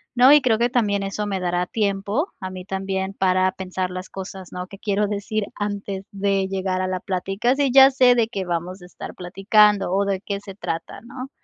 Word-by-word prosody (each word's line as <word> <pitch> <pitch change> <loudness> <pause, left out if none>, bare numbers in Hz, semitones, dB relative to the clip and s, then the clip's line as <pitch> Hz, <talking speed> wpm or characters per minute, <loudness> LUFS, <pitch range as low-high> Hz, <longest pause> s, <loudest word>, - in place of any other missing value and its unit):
¿no? 255 +2 +7
Y 295 - +7
creo 240 -4 +2
que 240 +2 +2
también 210 -5 +1
eso 195 +2 -3
me 195 -2 -2
dará 175 0 -1
tiempo, 205 - -1
a 185 - -5
mí 185 -1 -8
también, 190 0 -3
para 185 -1 +2
pensar 185 -1 -4
las 185 +1 -6
cosas, 190 -1 -8
¿no? 180 0 -5
Que 195 +1 -12
quiero 205 0 0
decir 205 +1 -2
antes 200 -1 -4
de 195 -1 0
llegar 190 -1 -2
a 185 - -1
la 185 0 -2
plática, 195 +7 -1
si 280 -2 +1
ya 270 +1 +8
sé 255 -2 +5
de 230 -2 +2
qué 200 -4 -4
vamos 175 +1 -4
a - - -11
estar 180 - -9
platicando 195 +2 +3
o 200 +1 +2
de 195 -1 -1
qué 200 -1 -4
se 200 -1 -11
trata, 165 -3 -5
¿no? 255 +3 -8
195 Hz, 215 wpm, -22 LUFS, 185-210 Hz, -, ya